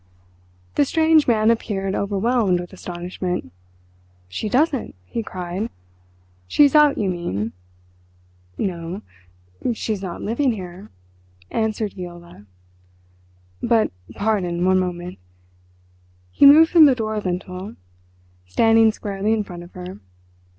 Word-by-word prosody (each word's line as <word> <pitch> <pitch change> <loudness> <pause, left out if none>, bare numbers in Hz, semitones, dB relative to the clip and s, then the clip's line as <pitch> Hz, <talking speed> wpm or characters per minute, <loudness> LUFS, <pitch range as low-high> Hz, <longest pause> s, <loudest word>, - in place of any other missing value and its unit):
The - - +5
strange 315 +1 +3
man 220 -2 +4
appeared 195 -4 -2
overwhelmed 200 -1 +1
with 175 +1 -8
astonishment. 180 - -5 0.8
"She 210 - -4
doesn't?" 270 - +1
he 230 - -4
cried. 185 +1 -4 0.8
"She 295 - +4
is 285 - +4
out, 300 -2 +5
you 205 - 0
mean!" 115 - -2 1.1
"No, 180 0 -4 0.7
she's 215 -3 -3
not 185 -3 -6
living 240 +4 +1
here," 185 -1 -9 0.6
answered 220 -1 -1
Viola. 175 - -10 1.1
"But—pardon—one 185 - 0
moment." 180 - -4 1.1
He 280 - +6
moved 315 +3 +8
from 330 -3 +8
the 275 -3 +5
door 220 -2 -2
lintel, 185 +1 -5 0.7
standing 225 - +4
squarely 205 0 -2
in 220 -1 0
front 175 -3 -9
of 175 +1 -13
her. 180 - -8
200 Hz, 110 wpm, -22 LUFS, 180-225 Hz, 1.1 s, moved